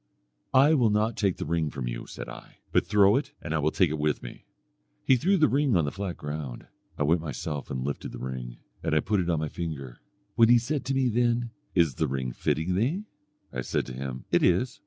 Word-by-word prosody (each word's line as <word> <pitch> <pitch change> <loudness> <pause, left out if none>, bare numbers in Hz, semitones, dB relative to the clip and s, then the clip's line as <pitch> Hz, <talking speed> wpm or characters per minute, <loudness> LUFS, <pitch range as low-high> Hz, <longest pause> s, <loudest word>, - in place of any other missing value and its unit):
"'I 140 +4 +7
will 125 -7 +4
not 105 +2 +1
take 100 -4 +1
the - - -4
ring 80 -1 0
from 65 -4 -5
you,' - - -5
said - - -7
I, - - -11
'but - - +2
throw 100 +2 +5
it 140 0 -3
and 80 - -4
I 80 - +1
will 75 +1 +2
take 90 -1 +2
it 80 - -2
with 75 0 0
me.' - - -10 0.6
He 130 - +6
threw 190 +11 +2
the 155 -3 +5
ring 140 -4 +2
on 85 -4 +3
the 70 - -2
flat 95 -4 -4
ground; 75 -4 -6 0.3
I - - +1
went 80 +3 +3
myself 75 -1 -4
and 65 -1 -3
lifted 70 - -4
the - - -7
ring, 65 -2 -6 0.2
and 80 - 0
I - - +5
put 100 +5 0
it 90 -1 -1
on 85 - +2
my 75 0 -1
finger. 70 -8 -6 0.3
When 115 -1 +5
he 120 - +8
said 130 +4 -2
to 135 +2 -1
me 130 -1 +2
then, 120 0 +1 0.2
'Is 85 -6 +4
the 80 - 0
ring 65 -2 -2
fitting 80 +8 -1
thee?' 135 - 0 0.5
I 65 - -2
said - - -1
to 65 - -7
him, 65 0 -5
'It - - +4
is.' 95 +8 +2
85 Hz, 240 wpm, -27 LUFS, 70-120 Hz, 0.6 s, he